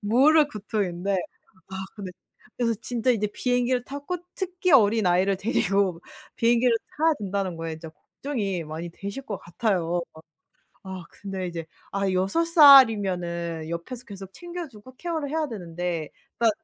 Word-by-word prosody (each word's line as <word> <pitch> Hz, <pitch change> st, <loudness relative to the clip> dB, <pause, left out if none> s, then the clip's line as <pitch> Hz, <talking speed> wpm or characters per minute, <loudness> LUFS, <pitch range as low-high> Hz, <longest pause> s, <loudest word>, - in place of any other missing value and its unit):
모를 285 Hz, +8 st, +5 dB
고통인데. 200 Hz, -4 st, -2 dB, 0.5 s
아 190 Hz, -, -9 dB, 0.2 s
근데 200 Hz, -4 st, -7 dB, 0.5 s
그래서 230 Hz, -2 st, +1 dB
진짜 245 Hz, +1 st, 0 dB
인제 210 Hz, -3 st, +1 dB
비행기를 245 Hz, +2 st, 0 dB
타고 285 Hz, +7 st, -4 dB, 0.2 s
특히 365 Hz, -2 st, -1 dB
어린아이를 200 Hz, -5 st, +4 dB
데리고 195 Hz, -3 st, +1 dB, 0.4 s
비행기를 235 Hz, 0 st, +3 dB, 0.2 s
타야 320 Hz, 0 st, +4 dB
된다는 195 Hz, -3 st, -2 dB
거에 165 Hz, -1 st, -4 dB
진짜 160 Hz, 0 st, -9 dB
걱정이 200 Hz, -, -4 dB
많이 160 Hz, +3 st, -6 dB
되실 200 Hz, +9 st, -6 dB
것 205 Hz, -6 st, -5 dB
같아요 175 Hz, -2 st, -1 dB
막. 160 Hz, 0 st, -14 dB, 0.6 s
아 190 Hz, -1 st, -6 dB
근데 195 Hz, -2 st, -5 dB
이제 165 Hz, -2 st, -6 dB, 0.2 s
아 195 Hz, -1 st, 0 dB
6 190 Hz, -, +1 dB
살이면은 190 Hz, -, +5 dB
옆에서 225 Hz, +10 st, -6 dB
계속 195 Hz, -2 st, -10 dB
챙겨 345 Hz, -, -7 dB
주고 235 Hz, +2 st, -15 dB
케어를 320 Hz, -4 st, -3 dB
해야 315 Hz, -1 st, -1 dB
되는데. 175 Hz, -5 st, -4 dB, 0.3 s
딱 230 Hz, -1 st, +4 dB
205 Hz, 305 characters per minute, -25 LUFS, 180-255 Hz, 0.6 s, 모를